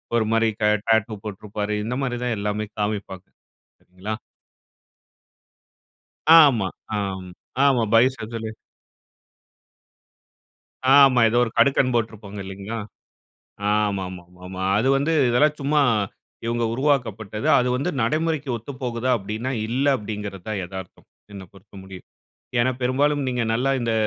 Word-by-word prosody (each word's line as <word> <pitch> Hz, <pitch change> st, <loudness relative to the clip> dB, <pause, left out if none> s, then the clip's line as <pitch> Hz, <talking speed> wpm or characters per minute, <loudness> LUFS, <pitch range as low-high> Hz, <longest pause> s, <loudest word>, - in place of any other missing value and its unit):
ஒரு 115 Hz, -2 st, +2 dB
மாரி 115 Hz, 0 st, +3 dB
க -, -, 0 dB, 0.2 s
டாட்டூ 110 Hz, 0 st, +2 dB
போட்டுருப்பாரு. 105 Hz, 0 st, -4 dB
இந்த 125 Hz, +3 st, -2 dB
மாரி 125 Hz, -2 st, -2 dB
தான் 120 Hz, -2 st, 0 dB
எல்லாமே 105 Hz, +1 st, -2 dB
காமிப்பாங்கா. 100 Hz, -3 st, -4 dB, 0.5 s
சரிங்களா? 95 Hz, +4 st, -6 dB, 2.2 s
ஆமா, 125 Hz, -11 st, +5 dB, 0.3 s
ஆமா, 95 Hz, -2 st, -4 dB, 0.4 s
ஆமா. 130 Hz, -4 st, +3 dB
பைசெப்ஸதுலே 115 Hz, -2 st, +1 dB, 2.4 s
ஆமா, 135 Hz, -3 st, +7 dB
ஏதோ 120 Hz, -, +1 dB
ஒரு 115 Hz, -, -3 dB
கடுக்கன் 135 Hz, -2 st, +3 dB
போட்டிருப்பாங்க 110 Hz, -3 st, -3 dB
இல்லைங்களா? 100 Hz, +4 st, -6 dB, 1.0 s
ஆமாமாமா, 95 Hz, -3 st, -3 dB, 0.2 s
அது 120 Hz, +5 st, +1 dB
வந்து 145 Hz, +4 st, 0 dB, 0.2 s
இதெல்லாம் 150 Hz, +5 st, +3 dB
சும்மா 145 Hz, +2 st, +2 dB, 0.6 s
இவங்க 115 Hz, 0 st, -1 dB
உருவாக்கப்பட்டது. 115 Hz, -6 st, -1 dB
அது 125 Hz, -, +1 dB
வந்து 140 Hz, +8 st, -1 dB
நடைமுறைக்கு 155 Hz, +4 st, 0 dB
ஒத்து 115 Hz, +5 st, -8 dB
போகுதா? 125 Hz, 0 st, -1 dB
அப்டின்னா 110 Hz, +5 st, -4 dB, 0.2 s
இல்ல 130 Hz, +5 st, -1 dB
அப்டிங்கிறது 105 Hz, -4 st, -6 dB
தான் 105 Hz, -3 st, -2 dB
எதார்த்தம், 95 Hz, 0 st, -9 dB, 0.3 s
என்ன 95 Hz, -1 st, -8 dB
பொறுத்த 95 Hz, +1 st, -20 dB
முடியும். 95 Hz, -1 st, -11 dB, 0.5 s
ஏன்னா, 120 Hz, +2 st, +3 dB
பெரும்பாலும் 140 Hz, +4 st, +1 dB
நீங்க 125 Hz, -1 st, -1 dB
நல்லா 125 Hz, +4 st, +1 dB
இந்த 115 Hz, -1 st, -1 dB
115 Hz, 115 wpm, -23 LUFS, 100-125 Hz, 2.4 s, ஆமா